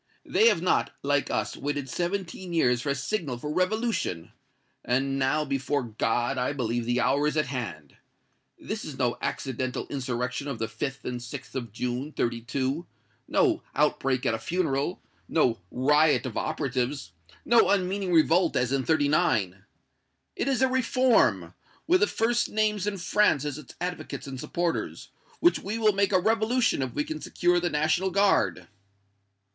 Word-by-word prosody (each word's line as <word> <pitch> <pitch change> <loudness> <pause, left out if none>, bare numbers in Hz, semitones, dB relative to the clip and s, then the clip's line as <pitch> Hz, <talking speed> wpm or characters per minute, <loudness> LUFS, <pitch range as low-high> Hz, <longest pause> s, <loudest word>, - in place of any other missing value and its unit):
They 225 - +4
have 200 -7 +3
not, 180 - +1
like 145 0 +1
us, - - -1
waited 145 -1 -3
seventeen 180 +3 -3
years 125 -7 +2
for 145 - -3
a 140 - +1
signal 140 - -2
for 150 +5 -4
revolution; 185 - -1 0.5
and 135 +2 0
now, 135 +3 +1
before 140 0 -1
God, 120 +3 -1
I 125 +3 0
believe 120 -3 -2
the 120 +1 +1
hour 145 +3 +2
is 150 - -1
at 155 - +2
hand! 100 - -6 0.6
This - - -5
is - - -7
no - - 0
accidental 130 0 -3
insurrection 125 0 -3
of 140 -4 -3
the 115 - -1
5th 135 +4 -5
and 125 -1 -3
6th 120 0 -8
of 120 -5 -4
June, 125 +6 -3
'32 130 +6 -2 0.4
no 350 -7 +2
outbreak 135 -3 +1
at - - +2
a 115 - -2
funeral 155 +3 -1 0.3
no 125 -8 +2
riot 150 +4 +3
of 125 - -5
operatives 135 - -2 0.3
no 235 -1 +5
unmeaning 190 -1 0
revolt, 165 +1 +4
as 125 0 +1
in 135 -1 +1
'39. 115 - +1 0.7
It - - -2
is 265 -1 +2
a - - +5
reform, 240 - +2 0.3
with 360 +3 +4
the 430 - +3
first 240 +2 +1
names 210 -2 0
in 205 -1 -1
France 185 -5 +2
as 145 0 -3
its 140 - -13
advocates 180 +1 -4
and 135 -2 -7
supporters, 170 +5 -3 0.3
which 345 - +4
we 210 +4 -4
will 215 -2 +3
make 200 0 +1
a 185 - +5
revolution 225 - +2
if 130 -1 -2
we 145 - +1
can 155 0 -6
secure 175 0 +1
the 175 0 0
National 160 +5 +1
Guard." 185 - +2
145 Hz, 160 wpm, -27 LUFS, 125-185 Hz, 0.7 s, no